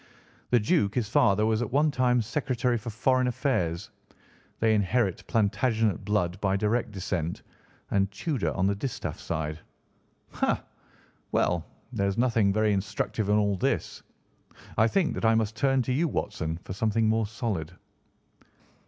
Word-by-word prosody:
The 120 - +4
Duke, 105 -1 +1
his 120 -4 0
father, 105 0 +3
was 110 +1 +1
at 120 - -3
one 150 +3 +3
time 125 -2 +2
Secretary 125 0 0
for 115 +1 -4
Foreign 130 +3 +2
Affairs. 100 - -1 0.7
They 110 -1 +3
inherit 105 -1 +1
Plantagenet 110 -1 +1
blood 90 -4 -1
by 95 -1 +2
direct 110 +4 0
descent, 90 -4 -3 0.5
and 100 -1 +2
Tudor 120 - -2
on 95 - 0
the 100 - +3
distaff 110 +5 -4
side. 80 -1 -3 0.7
Ha! - - 0 0.7
Well, 85 -2 +1 0.3
there 100 -4 +1
is 100 - -2
nothing 115 -5 +3
very 110 +1 +2
instructive 100 +1 -2
in 105 - +4
all 100 -2 +2
this. - - -1 0.7
I 110 - +4
think 175 +6 +1
that - - -5
I 110 0 +4
must 110 -1 0
turn 135 +2 +2
to 130 - -1
you 160 +6 +2
Watson, 80 - -3
for - - -6
something 110 +2 +1
more 110 0 +2
solid." 100 -7 -3
110 Hz, 155 wpm, -27 LUFS, 100-120 Hz, 0.7 s, The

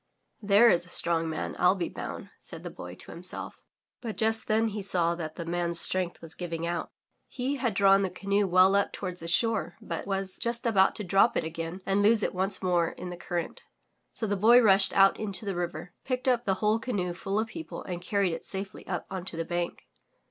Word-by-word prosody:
* - - -46
There 230 +4 +7
is 175 +1 +1
a - - -15
strong 165 -2 +1
man, 155 - -4
I'll 180 +2 +5
be 180 - -2
bound, - - -7
'* - - -45
said - - -6
the - - -6
Boy - - -9
to - - -11
him - - -9
self. - - -5 0.4
But 230 -3 -5
just 225 0 +1
then 220 +1 +2
he 210 0 -4
saw 175 -3 +1
that 160 -2 -6
the 170 - -6
man's 170 0 +1
strength 180 -2 0
was 165 - -6
giving 170 -2 -4
out. 170 0 -3 0.4
He 265 +3 -3
had 235 -6 -1
drawn 195 0 +5
the 190 - 0
cance 200 +2 0
well 185 +1 +5
up 200 0 +2
toward 180 -2 -5
the 165 - -7
shore, 175 -2 0
but 170 +2 -5
was 195 -1 -2
just 235 0 -2
about 195 -5 +4
to 210 - -4
drop 195 +5 +3
it - - 0
again 165 +3 -5
and 195 +1 +2
lose 215 +1 +4
it - - -1
once 190 +1 -1
more 175 -2 +2
in 180 - -7
the - - -5
cur 175 0 -7
rent. - - -12 0.5
So 225 - -2
the 205 -1 0
Boy 225 +5 +6
rushed 195 -4 +5
out 195 0 +5
into 205 -1 0
the 195 -2 -2
river, 175 0 -4
picked 255 0 -3
up 245 -2 +2
the 190 - +2
whole 215 +3 +1
canoe 200 -7 -2
full 195 +3 -3
of 220 +1 0
people 325 +7 -7
and 175 -2 -5
carried 195 -1 0
it - - -6
safely 195 0 -5
up - - -3
onto 185 -3 -5
the 165 - -2
bank. 175 0 -3
190 Hz, 235 wpm, -28 LUFS, 175-215 Hz, 0.5 s, There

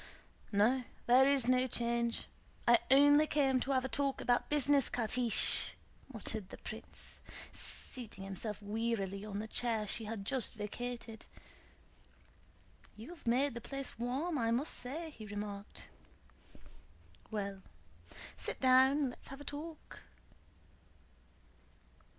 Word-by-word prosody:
"No, 230 +6 +3 0.2
there 255 +2 +6
is 275 -4 +3
no 255 0 +3
change. 235 -1 0 0.4
I 235 0 +7
only 290 +3 +7
came 270 -4 +2
to 255 - -4
have 260 -1 +2
a - - 0
talk 275 0 -1
about 245 0 +1
business, 285 -2 +3
Catiche," 235 +1 +3 0.2
* - - -29
muttered 215 -4 -4
the - - -9
prince, - - -9 0.3
seating 225 -6 -2
himself 195 +2 -4
wearily 205 -2 -2
on 210 -1 -5
the 215 +2 -4
chair 225 -1 0
she 220 +2 -2
had 210 -2 -5
just 260 0 +1
vacated. 225 +1 -6 1.7
"You 220 +6 -10
have 345 -8 -13
made 260 +3 +2
the 235 - -6
place 275 -3 -6
warm, 275 +7 -1
I 230 -1 +1
must 250 +7 +1
say," 310 +6 -5
he 220 -7 -10
remarked. 205 0 -6 1.4
"Well, 200 -2 -4 0.7
sit - - -4
down: 265 +1 +5
let's - - -13
have 275 +1 -9
a - - -7
talk." 300 +3 -8
245 Hz, 125 wpm, -34 LUFS, 215-270 Hz, 1.7 s, I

